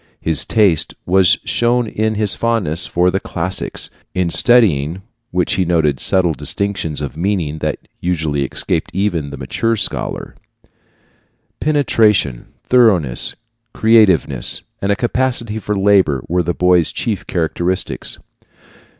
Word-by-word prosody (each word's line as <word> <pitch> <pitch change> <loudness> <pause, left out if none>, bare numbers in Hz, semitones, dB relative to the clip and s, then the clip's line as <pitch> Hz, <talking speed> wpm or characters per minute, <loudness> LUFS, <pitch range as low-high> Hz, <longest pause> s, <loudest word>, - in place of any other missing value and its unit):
His 80 -3 +1
taste 100 -8 +2
was 95 0 +4
shown 120 +1 +1
in 110 0 -2
his 105 -1 +1
fondness 110 -9 0
for 90 +1 +1
the 95 - -1
classics, 90 +1 -4 0.2
in 90 -2 0
studying 95 - +3 0.3
which 90 0 0
he 95 - +1
noted 80 -6 +1
subtle 90 -3 +2
distinctions 85 -1 -3
of 70 -2 -5
meaning 85 -4 -2
that - - -4
usually 80 -5 -1
escape 65 - -2
even 90 -7 -1
the 70 - -8
mature 115 - -1
scholar. 105 - -3 1.3
Penetration, 110 - +1 0.2
thoroughness, 100 - +2 0.4
creativeness, 95 - +3 0.2
and 100 - 0
a - - +2
capacity 120 -2 -1
for 105 -1 -3
labor 95 -9 +3
were 90 +2 +1
the 85 0 -2
boy's 90 -2 +2
chief 110 -5 -3
characteristics. 85 +2 -2
90 Hz, 125 wpm, -17 LUFS, 80-105 Hz, 1.3 s, was